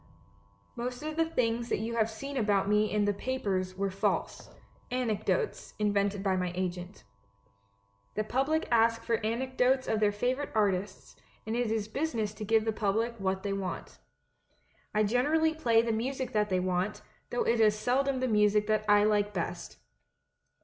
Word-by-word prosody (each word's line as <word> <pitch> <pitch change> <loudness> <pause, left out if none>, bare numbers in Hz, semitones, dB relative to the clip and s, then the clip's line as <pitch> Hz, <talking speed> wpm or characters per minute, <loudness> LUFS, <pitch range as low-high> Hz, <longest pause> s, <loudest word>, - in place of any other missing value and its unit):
"Most 245 +3 -4
of 310 0 -4
the 325 0 +1
things 235 -4 0
that - - +1
you 225 +3 -3
have 220 -1 +2
seen 275 +6 -7
about 205 -5 +2
me 210 +1 +2
in 210 -1 +2
the 205 - +2
papers 195 -5 -2
were 195 0 -1
false 190 - -2 0.2
— - - -32
anecdotes 250 - -1
invented 205 -1 0
by 190 -2 +2
my 180 -1 -1
agent. 180 +1 -4 1.1
The 215 - 0
public 275 +8 0
ask 230 0 +3
for 230 -2 -1
anecdotes 255 +3 +1
of 220 - +1
their 210 -1 +3
favourite 250 +7 -1
artists, 195 -2 -1 0.3
and 220 +1 -2
it 240 -2 0
is 220 -1 -1
business 230 -4 -2
to 215 - -7
give 220 +1 +2
the 225 - +1
public 220 +2 0
what 190 0 -1
they 200 -1 -1
want. 195 -2 -5 0.9
I 215 - +2
generally 295 +9 +2
play 230 -8 +3
the 230 - 0
music 260 +4 -2
that 210 -1 +1
they 185 -1 +1
want, 185 +2 -1 0.3
though 245 - 0
it 230 0 +1
is 215 -1 +4
seldom 260 +4 +1
the 255 - +1
music 210 -1 +3
that 215 0 +1
I 205 0 +6
like 205 -1 +1
best. 170 - -4
220 Hz, 170 wpm, -30 LUFS, 205-245 Hz, 1.1 s, I